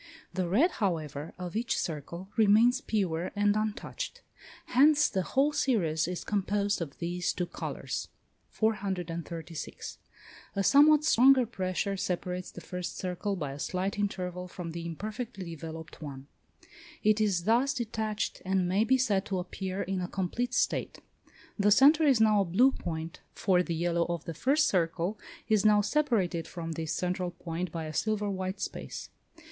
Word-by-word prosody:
The 180 -1 -1
red, 280 - +4
however, 160 - -2
of 180 +1 -6
each 235 +2 0
circle, 170 +4 -5
remains 225 +3 +5
pure 180 -5 -1
and 205 0 +3
untouched; 215 - -3 0.4
hence 295 +4 +5
the 190 - -1
whole 275 - +1
series 170 - +1
is 180 -1 -4
composed 200 -1 0
of 150 -4 -5
these 175 +1 -1
two 180 - -2
colours. - - -5 0.4
436. 175 -7 -3 0.6
A 200 - +1
somewhat 295 +5 +6
stronger 260 -2 +6
pressure 195 -2 -2
separates 180 -1 -3
the 175 - -10
first 180 +2 -5
circle 185 +2 -2
by 150 -6 -4
a 140 - -8
slight 190 +6 -2
interval 180 -3 -2
from 175 -2 -6
the 170 0 -5
imperfectly 210 +1 -5
developed 160 +1 -8
one: 140 -3 -7 0.8
it 215 0 +4
is 195 -5 +1
thus 240 +7 +3
detached, 220 -2 -2
and 190 -1 +1
may 190 +4 +2
be 260 +3 +3
said 210 -7 +2
to 195 - -1
appear 185 +1 -3
in 185 +1 -2
a 180 - -2
complete 215 +7 -2
state. - - 0 0.6
The 205 +1 +4
centre 295 +8 +6
is 265 -5 +5
now 215 -2 +5
a - - +1
blue 225 +10 +4
point; 165 -6 -5 0.2
for 185 -3 +3
the 170 -2 -2
yellow 170 0 +1
of 170 -3 -3
the 165 - -4
first 280 - +2
circle 175 +3 0 0.3
is 215 -2 +3
now 210 -1 +5
separated 205 - 0
from 165 -2 -6
this 160 -1 -3
central 180 0 -1
point 175 0 -5
by 165 -1 -4
a 155 - -6
silver 210 +3 0
white 190 0 -3
space. - - -5
190 Hz, 160 wpm, -30 LUFS, 170-215 Hz, 0.8 s, somewhat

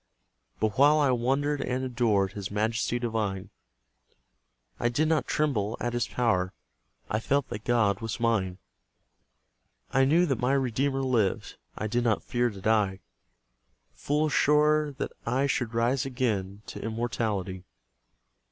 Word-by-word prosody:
But 110 +2 -1
while 145 +2 +6
I 145 -3 +3
wondered 135 +4 0
and 130 +1 -2
adored 110 -6 +1
His 100 -2 -5
Majesty 110 +3 0
divine, 105 -5 -2 1.3
I 120 - +1
did 150 +6 +1
not 155 -1 +1
tremble 115 -8 0
at 120 0 -2
His 120 -2 0
power: 95 -7 0 0.5
I 105 - -1
felt 140 +4 0
that 105 - -6
God 110 -5 +2
was 115 0 -4
mine; 105 -6 0 1.3
I 135 0 +4
knew 165 +6 +4
that 135 -8 -1
my 125 +2 +1
Redeemer 135 +1 0
lived; 115 -7 0 0.2
I - - -3
did 120 +3 0
not 110 -3 +1
fear 120 0 0
to 100 -3 -10
die; 105 -3 +1 0.9
Full 150 +2 0
sure 150 +1 +3
that 135 - -4
I 135 +3 +1
should 125 -4 -1
rise 120 +3 +2
again 110 -7 -2
To - - -8
immortality. 110 -5 -2
120 Hz, 140 wpm, -28 LUFS, 105-135 Hz, 1.3 s, while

